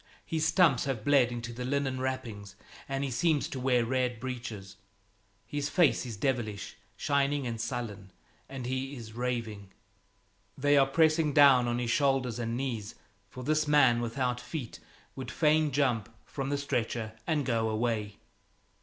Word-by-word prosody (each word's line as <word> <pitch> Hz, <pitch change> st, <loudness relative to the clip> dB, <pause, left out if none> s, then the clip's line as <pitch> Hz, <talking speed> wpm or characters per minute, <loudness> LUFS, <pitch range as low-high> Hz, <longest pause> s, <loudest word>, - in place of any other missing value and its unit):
His 160 Hz, -1 st, 0 dB
stumps 165 Hz, -10 st, +4 dB
have 130 Hz, -6 st, -3 dB
bled 135 Hz, -4 st, +4 dB
into 120 Hz, 0 st, -5 dB
the 125 Hz, +2 st, -5 dB
linen 135 Hz, 0 st, -1 dB
wrappings, 115 Hz, -7 st, -4 dB, 0.3 s
and 135 Hz, 0 st, -1 dB
he 135 Hz, -, -2 dB
seems 150 Hz, +4 st, +1 dB
to 140 Hz, -4 st, -5 dB
wear 125 Hz, -2 st, +2 dB
red 125 Hz, -1 st, 0 dB
breeches. 115 Hz, -7 st, -6 dB, 0.7 s
His 145 Hz, -1 st, -3 dB
face 165 Hz, -7 st, +3 dB
is 115 Hz, -4 st, -6 dB
devilish, 110 Hz, -4 st, -2 dB, 0.2 s
shining 140 Hz, -1 st, +1 dB
and 115 Hz, -2 st, -3 dB
sullen, 115 Hz, -5 st, -5 dB, 0.4 s
and 135 Hz, -2 st, -6 dB
he 130 Hz, +2 st, -3 dB
is 115 Hz, -3 st, -9 dB
raving. 115 Hz, -5 st, -4 dB, 0.8 s
They 145 Hz, +1 st, +3 dB
are 135 Hz, -1 st, +5 dB
pressing 155 Hz, +1 st, +3 dB
down 135 Hz, -4 st, +6 dB
on 120 Hz, 0 st, 0 dB
his 120 Hz, -1 st, -1 dB
shoulders 135 Hz, -4 st, +1 dB
and 115 Hz, 0 st, -2 dB
knees, 115 Hz, -5 st, -4 dB, 0.3 s
for 125 Hz, -, -9 dB
this 155 Hz, +2 st, +1 dB
man 135 Hz, -5 st, +5 dB
without 125 Hz, +1 st, -1 dB
feet 135 Hz, -7 st, -6 dB, 0.4 s
would 130 Hz, -, -6 dB
fain 155 Hz, -1 st, +3 dB
jump 125 Hz, -7 st, 0 dB, 0.2 s
from 135 Hz, -1 st, -4 dB
the 145 Hz, -, 0 dB
stretcher 120 Hz, -5 st, -2 dB
and 150 Hz, -3 st, +1 dB
go 115 Hz, -3 st, +1 dB
away. 110 Hz, -2 st, -1 dB
125 Hz, 155 wpm, -30 LUFS, 115-140 Hz, 0.8 s, down